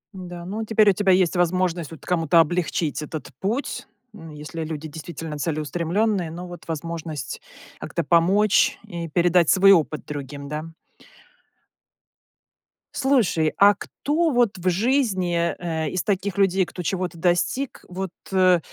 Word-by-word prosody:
Н-да, 175 -2 -8
ну, 210 +4 -4
теперь 215 -1 +4
у - - -1
тебя 195 0 +2
есть 185 -1 +3
возможность 175 -2 0
вот 160 - -12
кому-то 165 -2 +3
облегчить 165 -2 0
этот 155 0 -7
путь. 230 +9 -3 0.3
Ну, 165 -6 -11
если 150 +2 -6
люди 155 0 -5
действительно 160 0 -7
целеустремленные, 170 +5 -1
но 175 +3 -7
вот 175 0 -11
возможность 160 -3 -5 0.4
как-то 170 - -3
помочь 185 +7 +3
и 170 -5 -6
передать 175 0 +3
свой 195 +1 +6
опыт 155 -4 +2
другим, 140 -1 -7
да. 150 +2 -4 2.3
Слушай, 235 - +2
а 205 +1 +7
кто 310 +10 -1
вот 240 -8 +1
в 185 +1 +1
жизни, 185 -6 +1
э, 160 -3 -2
из 185 - -2
таких 200 -2 -1
людей, 195 -1 +3
кто 180 0 -7
чего-то 185 -1 -2
достиг, 175 +10 0
вот, 185 0 -4 0.2
э, 185 -2 +4
175 Hz, 140 wpm, -23 LUFS, 160-195 Hz, 2.3 s, а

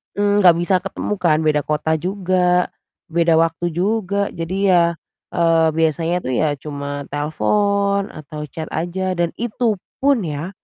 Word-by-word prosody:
mmm, 205 0 +2
enggak 175 -4 +7
bisa 175 +2 +1
ketemu 195 +2 -4
kan 160 -2 +2
beda 150 -1 +3
kota 150 +2 -1
juga, 180 -1 +1 0.4
beda 165 0 +2
waktu 165 +1 +1
juga 200 +2 0
jadi 170 +3 -4
ya, 175 -2 +6 0.5
eee, 165 -1 +3
biasanya 165 +2 +1
tuh 130 - -1
ya 155 +5 +2
cuma 145 0 -5
telepon 200 +7 +1
atau 150 0 -7
chat 160 +2 -6
aja 185 +3 -2
dan 170 -1 +1
itu 230 -2 -1 0.2
pun, 275 -4 +3
ya, 150 +3 -4
170 Hz, 145 wpm, -20 LUFS, 155-195 Hz, 0.5 s, enggak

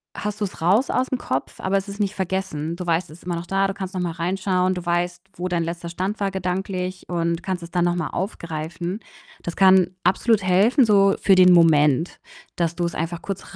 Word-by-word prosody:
hast 210 +1 -4
du's 200 -4 -4
raus 205 +10 +3
aus'm 255 0 0
Kopf, 130 - -4
aber 195 +1 +1
es 195 0 -3
ist 200 +1 -8
nicht 205 0 -1
vergessen. 185 -4 -3
Du 180 0 -6
weißt, 170 +1 0
es 160 - -13
ist - - -20
immer 175 -1 -3
noch 170 - -5
da. 195 +1 +1
Du 195 - -3
kannst 190 -1 -6
noch 185 - -2
mal 175 -1 -1
reinschauen. 185 +1 0
Du 180 -1 -5
weißt, 175 +1 -1
wo 180 - -3
dein 175 -2 0
letzter 170 +1 -5
Stand 190 +5 -3
war 200 -1 0
gedanklich 185 0 -3
und 170 -1 -1
kannst 185 -2 -3
es 170 - -9
dann 175 -1 +1
noch 175 - +1
mal 165 -3 -2
aufgreifen. 170 0 -4 0.4
Das 170 - -5
kann 190 -2 +5
absolut 210 +4 +2
helfen, 205 +9 +4
so 195 -2 +4
für 195 - +5
den 180 -1 +7
Moment, 160 -2 +4 0.4
dass 170 -1 -1
du's 170 -1 -2
einfach 165 +1 -3
kurz 195 0 -7
180 Hz, 215 wpm, -22 LUFS, 170-195 Hz, 0.4 s, den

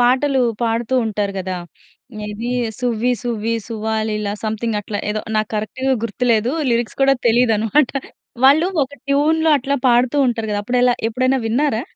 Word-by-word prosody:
పాటలు 260 +2 +3 0.2
పాడుతూ 230 +2 0
ఉంటారు 205 -2 -2
గదా! 185 -1 -3 0.7
ఇదీ 225 +4 -4 0.3
'సువ్వి 245 0 0
సువ్వి 230 -1 -2
సువ్వాలీల' 220 -2 -2
సంథింగట్లా 215 -1 -2
ఏదో, 215 - -2 0.2
నాకు 215 0 0
కరక్ట్‌గా 260 +5 -1
గుర్తులేదు. 230 0 +1 0.2
లిరిక్స్ 235 +1 -1
కూడా 270 0 +5
తెలీదనమాట. 235 +3 +3 0.5
వాళ్ళూ 305 +6 +6
ఒక 270 +1 -4
ట్యూన్‍లో 315 +3 +2
అట్లా 280 +2 -1
పాడుతూ 245 +2 +3
ఉంటరు 230 -3 -1
గదా! 205 - 0
అప్పుడెలా? 245 +1 +2
ఎప్పుడైనా 255 +3 +1
విన్నారా? 245 0 +1
235 Hz, 130 wpm, -19 LUFS, 215-260 Hz, 0.7 s, వాళ్ళూ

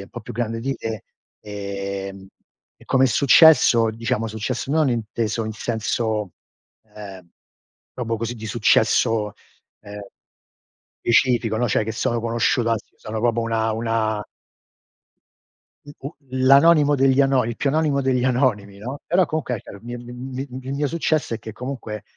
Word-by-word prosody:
un - - -13
po' 120 - -8
più - - -9
grande 115 -1 -2
di 135 +2 -2
te, 110 -2 -6 0.4
ehm, 100 -1 -6 0.5
e - - -19
come 130 0 +3
è - - +5
successo, 125 -3 +6
diciamo 115 +1 -2
successo, 110 +5 -4
non 155 -3 +2
inteso 115 0 -2
in 110 - -4
senso 110 -3 -2 0.6
ehm, 95 -4 -10 0.6
proprio 115 -2 -2
così 115 +1 -3
di 110 - -10
successo 110 0 +2 0.5
ehm, 105 0 -9 1.0
specifico, 120 -2 +2
no, 120 - +1
cioè 105 - +1
che 110 - -4
sono 115 +1 -1
conosciuto, 115 +1 +1
anzi 110 -2 -3
sono 110 0 -6
proprio 120 0 +1
una 115 -1 0
una 110 -2 -1 1.6
I 145 - -12
u 140 +4 -7 0.2
l'anonimo 140 +3 +5
degli 135 0 +3
ano 135 -2 +3
il 115 0 -4
più 140 - 0
anonimo 150 -2 +1
degli 130 -2 +1
anonimi, 120 -6 0
no, 125 +7 -6
però 180 +2 +3
comunque, 155 -6 -3
ecco, 105 - -9
il - - -15
mi 120 +1 -6
m 125 +2 -7
m 130 +2 -6
mio 145 +1 0
successo, 155 -3 -1
è - - -5
che 110 0 -9
comunque 115 -3 -6
115 Hz, 155 wpm, -22 LUFS, 110-130 Hz, 1.6 s, successo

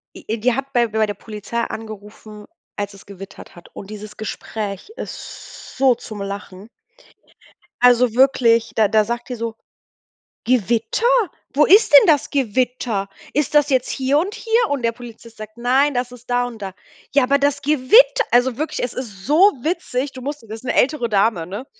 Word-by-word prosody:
E 225 +2 -5
die 240 +3 +1
hat 270 +2 -4
bei 240 -1 +3
bei 220 0 0
der 205 - -4
Polizei 215 +3 -6
angerufen, 215 -1 -8 0.3
als 205 0 -4
es 195 - -15
gewittert 195 -1 -12
hat. 175 - -15
Und 195 - -10
dieses 210 0 -9
Gespräch 215 - -6
ist - - -10
so 260 -2 +4
zum 210 -3 -9
Lachen. 200 0 -7 1.1
Also 245 -2 +5
wirklich, 240 -3 +3
da 215 -2 +4
da 215 +1 +3
sagt 235 +2 -5
die 250 - -4
so: 230 -1 -5 0.9
„Gewitter? 245 - 0 0.5
Wo 300 - +4
ist 405 +5 +5
denn 455 - +9
das 300 -4 +2
Gewitter? 245 -5 -1 0.3
Ist 295 0 -1
das 295 0 +4
jetzt 260 -2 +1
hier 270 +2 +1
und 395 +7 -2
hier?“ 460 -2 0
Und 280 -4 -1
der 230 0 +1
Polizist 230 -1 -13
sagt: 215 +1 -11
„Nein, 265 +4 +2
das 245 0 -2
ist 245 0 -14
da 245 0 +1
und 225 -4 -10
da.“ 190 - -5 0.4
„Ja, 280 -2 +4
aber 280 +2 +2
das 285 0 0
Gewitter“ 440 - +4
Also 245 0 +2
wirklich, 310 +2 -3
es 245 - -3
ist 205 -7 -8
so 295 - +2 0.3
witzig. 290 -5 -2
Du 255 - -10
musst 280 -4 -6
wissen 225 +3 -8
'ne - - 0
ältere 255 -2 +1
Dame, 200 -5 +1
ne? 205 +8 -7
245 Hz, 180 wpm, -20 LUFS, 215-275 Hz, 1.1 s, denn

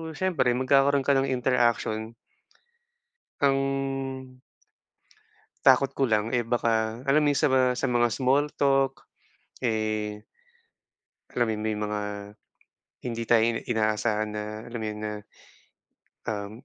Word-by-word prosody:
siyempre, 155 -9 +1
magkakaroon 135 +2 +3
ka 140 - +4
ng 135 - 0
interaction. 120 -3 0 1.3
Ang 135 -1 -1 1.2
takot 135 +1 +5
ko 140 - +2
lang, 105 -1 +2
eh 120 - +1
baka 115 -1 0
alam 145 +3 +4
mo - - +2
yung - - 0
sa - - +5
mga 130 -1 +4
sa 135 - 0
mga 120 -1 +3
small 135 +3 +2
talk, 135 -1 +1 0.6
eh 110 -2 -1 1.1
alam 120 - +2
mo - - 0
yun, 105 - -5
may 110 -1 0
mga 105 0 -2 1.1
hindi 115 -1 -3
tayo 115 -2 +6
i 115 - +2 0.2
inaasahan 110 -1 0
na 105 0 -3 0.2
alam 120 0 -6
mo - - -3
yun 105 0 -4
na, 105 0 -3 1.2
um, 100 -2 -3
120 Hz, 130 wpm, -26 LUFS, 110-135 Hz, 1.3 s, tayo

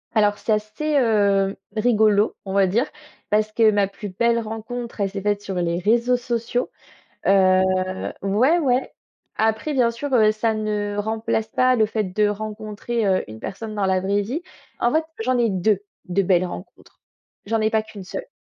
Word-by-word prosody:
Alors, 205 -1 +3
c'est 220 - 0
assez, 215 +9 -1
heu, 200 -5 +2 0.2
rigolo, 215 -2 +3
on 190 - -4
va 195 -1 +4
dire, 225 +8 +1 0.4
parce 215 0 +1
que 220 0 +4
ma 205 -2 +2
plus 200 +1 -8
belle 235 +5 +1
rencontre, 230 +1 -6
elle 195 - +1
s'est 195 -1 -5
faite 205 0 0
sur 195 - -5
les 175 -1 0
réseaux 235 +5 +2
sociaux, 240 0 -2 0.6
heu 185 -1 +5 0.6
ouais, 230 - +3
ouais, 260 -3 0 0.4
après, 220 +7 0
bien 240 -3 +3
sûr, 270 +4 -5
heu, 215 -3 +5
ça 220 +1 0
ne 210 -1 -2
remplace 220 +1 -1
pas 255 +2 +3
le 220 -3 +3
fait 215 0 -1
de 205 +3 +1
rencontrer, 215 +2 -3
heu, 190 -1 +2
une 110 - -9
personne 215 +2 -6
dans 200 -2 0
la 190 -1 +2
vraie 200 +2 0
vie, 260 - -3 0.4
en 240 - +1
fait, 315 - +3 0.2
j'en 250 +2 +1
ai 235 -2 +2
2, 195 +1 +1 0.3
de 185 +2 +1
belles 185 -1 +2
rencontres, 180 +1 -10 0.4
j'en 225 +2 0
ai 215 - +2
pas 220 -1 +2
qu'une 215 -3 -10
seule. - - -6
215 Hz, 180 wpm, -22 LUFS, 200-235 Hz, 0.6 s, heu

